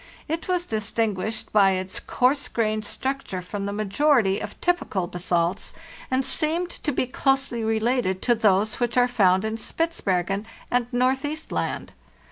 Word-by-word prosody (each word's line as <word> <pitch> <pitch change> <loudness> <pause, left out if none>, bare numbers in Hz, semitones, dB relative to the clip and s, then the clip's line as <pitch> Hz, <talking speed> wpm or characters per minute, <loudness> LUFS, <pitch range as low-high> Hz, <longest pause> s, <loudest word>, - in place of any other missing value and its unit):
It 325 +2 -3
was 360 -1 +1
distinguished 220 - -1
by 195 -2 +5
its 185 0 -2
coarse 270 +3 +1
grained 215 -2 -1
structure 265 -5 -3
from 200 +2 -4
the - - -2
majority 215 +1 +2
of - - -7
typical 350 - 0
basalts, 175 0 -1 0.3
and 260 0 +1
seemed 335 +3 0
to 295 - -3
be 255 - 0
closely 270 -2 +1
related 220 -3 +1
to 240 - +4
those 215 -1 +2
which 240 0 0
are 245 0 +5
found 195 -5 +3
in 220 +1 -2
Spitzbergen 205 - -1 0.2
and 245 -1 +2
Northeast 265 +5 0
Land. - - -3
225 Hz, 145 wpm, -24 LUFS, 200-270 Hz, 0.3 s, by